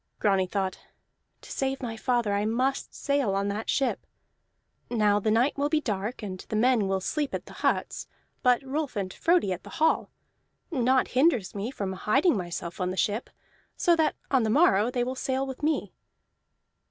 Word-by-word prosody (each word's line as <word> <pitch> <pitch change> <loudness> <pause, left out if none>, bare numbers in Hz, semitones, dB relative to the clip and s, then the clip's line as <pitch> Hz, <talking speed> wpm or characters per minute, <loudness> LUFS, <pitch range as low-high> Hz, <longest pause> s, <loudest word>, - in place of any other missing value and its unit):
Grani 195 -3 +2
thought: 190 0 -2 0.6
"To - - -12
save 270 0 -1
my 235 -4 -4
father 235 -2 0
I 200 +1 +1
must 250 +5 -1
sail 280 -8 0
on 200 +1 0
that 210 +2 -4
ship. 270 - 0 0.8
Now 210 -3 +3
the 215 - 0
night 240 +6 +2
will 290 +1 +1
be 310 0 +2
dark, 215 -2 -3
and 185 -3 -5
the - - -2
men 230 -2 +3
will 190 0 0
sleep 295 +7 -2
at - - -5
the - - -12
huts, - - 0 0.3
but 250 +1 +3
Rolf 275 0 -3
and 190 -2 -3
Frodi 335 - +2
at 180 - -7
the - - -12
hall. 320 - +2 0.6
Naught 260 -3 +2
hinders 255 - +2
me 205 +3 -3
from 200 -8 -4
hiding 265 - +2
myself 175 -1 -5
on 180 - 0
the 185 - -4
ship, 210 +5 0 0.5
so 345 -2 +4
that 320 -1 +1 0.2
on 265 -2 +4
the 220 - 0
morrow 230 - +4
they 250 -1 0
will 255 +1 -2
sail 265 +1 -1
with 265 -1 -7
me." 305 +1 0
240 Hz, 185 wpm, -27 LUFS, 200-270 Hz, 0.8 s, so